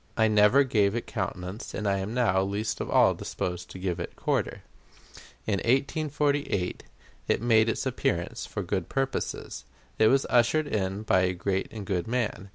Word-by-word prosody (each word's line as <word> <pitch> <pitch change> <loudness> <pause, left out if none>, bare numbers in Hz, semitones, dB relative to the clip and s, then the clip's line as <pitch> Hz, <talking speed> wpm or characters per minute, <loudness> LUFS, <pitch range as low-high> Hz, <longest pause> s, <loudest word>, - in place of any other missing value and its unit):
I 110 -1 +4
never 105 +6 +5
gave 105 -6 +2
it 120 - -2
countenance, 95 0 -5
and 105 - -2
I 100 -1 +1
am 95 +3 -4
now 115 -6 +2
least 100 +3 -2
of - - -4
all - - +5
disposed 90 0 -4
to - - -9
give 90 -1 -2
it 85 - -6
quarter. - - -1 0.8
In 100 -3 0
1848 140 - 0 0.5
it - - +2
made 115 -1 +4
its - - -2
appearance - - -2
for 105 - -4
good 90 -1 -2
purposes. 135 0 -3 0.4
It 110 - +6
was 135 +3 +3
ushered 125 +6 +3
in 100 -5 -2
by 95 -4 +3
a 90 0 +1
great 95 +2 -1
and 105 -3 -7
good 95 -1 -2
man. 110 -5 -2
105 Hz, 170 wpm, -27 LUFS, 95-120 Hz, 0.8 s, It